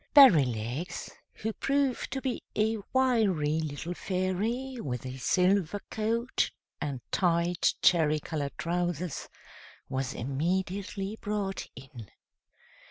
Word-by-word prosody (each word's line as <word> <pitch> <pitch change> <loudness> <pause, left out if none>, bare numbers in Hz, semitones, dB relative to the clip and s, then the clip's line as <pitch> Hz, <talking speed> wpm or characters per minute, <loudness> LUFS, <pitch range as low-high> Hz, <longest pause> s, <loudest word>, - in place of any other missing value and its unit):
Berrylegs, 140 - +5 0.2
who 220 +1 -4
proved 275 0 0
to 265 - -3
be 260 -3 -1
a 220 +1 +2
wiry 205 - +2
little 155 +2 -3
Fairy, 205 +9 -1
with 125 -3 -4
a 130 0 -5
silver 185 +5 +2
coat 230 +3 0 0.3
and 135 -4 -3
tight, 170 -1 +2
cherry 155 -3 +5
colored 145 -2 -4
trousers, 175 -2 -2 0.6
was 135 0 -2
immediately 190 - -2
brought 205 -2 -2
in. 125 -5 -11
180 Hz, 100 wpm, -29 LUFS, 145-215 Hz, 0.6 s, Berrylegs